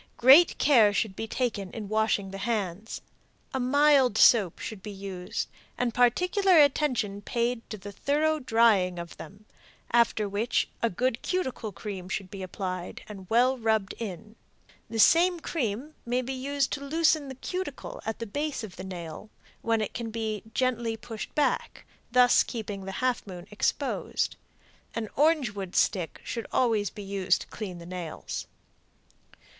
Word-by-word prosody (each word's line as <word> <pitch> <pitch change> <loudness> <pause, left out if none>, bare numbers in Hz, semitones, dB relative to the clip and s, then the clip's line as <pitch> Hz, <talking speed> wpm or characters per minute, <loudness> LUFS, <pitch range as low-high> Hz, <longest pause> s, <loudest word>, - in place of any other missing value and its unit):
Great 275 +8 +7
care 235 -8 +5
should 205 -1 -1
be 225 - -4
taken 220 -6 -2
in 215 -3 -5
washing 215 -2 0
the 195 - -6
hands. 210 -1 -3 0.5
A 265 - -1
mild 270 -2 +4
soap 205 -8 +5
should 215 -4 -7
be 210 - -7
used, 195 -2 -5 0.3
and 245 -2 0
particular 360 - +3
attention 255 -9 +3
paid 235 +2 -1
to 215 - -5
the 200 +1 -9
thorough 305 +8 +1
drying 225 -8 +3
of 170 -1 -7
them, 200 +6 -11 0.5
after 230 -3 +3
which 205 +4 0
a 230 - +2
good 245 +5 -1
cuticle 260 - -2
cream 190 -2 -7
should 190 -1 -4
be 195 - -7
applied 185 -1 -5
and 195 -3 -10
well 250 +3 +3
rubbed 220 -3 +1
in. 215 0 -7 0.5
The 225 - -4
same 345 +9 +5
cream 275 -2 -3
may 245 +2 0
be 265 +2 -4
used 275 +1 -1
to 280 - -3
loosen 310 0 +2
the 265 - -7
cuticle 375 - -5
at 220 - -3
the 230 - -5
base 290 +5 -3
of 195 -4 -9
the 185 - -6
nail, 180 +1 -7 0.3
when 225 -1 +1
it 215 - -3
can 235 -1 -4
be 220 -2 -3
gently 235 -2 0
pushed 225 -1 -8
back, 295 - 0 0.3
thus 250 0 +6
keeping 205 -4 -5
the 195 - -5
half 255 -4 0
moon 180 -2 -8
exposed. 210 - -1 0.6
An 220 -2 -3
orange 300 -5 +3
wood 195 -3 -6
stick 180 -6 +1
should 230 -2 -5
always 220 -5 +2
be 205 - -9
used 195 -1 +1
to - - -9
clean 190 -5 -6
the 170 - -10
nails. 175 -2 -6
225 Hz, 160 wpm, -28 LUFS, 200-255 Hz, 0.6 s, Great